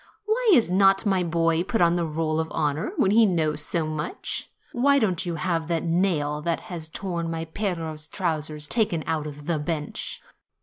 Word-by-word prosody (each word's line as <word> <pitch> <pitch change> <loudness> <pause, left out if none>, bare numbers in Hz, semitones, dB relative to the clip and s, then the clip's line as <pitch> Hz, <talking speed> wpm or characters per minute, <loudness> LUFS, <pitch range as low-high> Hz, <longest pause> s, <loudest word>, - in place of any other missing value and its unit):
Why 450 +2 +1
is 235 - +4
not 195 +2 +4
my 190 -3 +2
boy 165 -1 +1
put 210 +5 -1
on 170 0 +4
the 170 -2 0
roll 155 0 -1
of 160 - -1
honor, 150 0 -1
when 195 - +3
he 225 +1 +6
knows 155 -5 +2
so 165 -2 +1
much? 155 0 -4 0.2
Why 280 +1 +3
don't 185 -7 0
you 170 - -2
have 165 0 -1
that 165 -1 -1
nail 165 -4 0
which 165 -1 -4
tore 180 -3 -3
my 165 -1 -3
Piero's 165 -4 -3
trousers 155 -4 -2
taken 190 -8 +1
out 155 -1 -2
of 145 0 -9
the 165 -2 0
bench?" 150 -1 -4
165 Hz, 180 wpm, -25 LUFS, 155-190 Hz, 0.2 s, he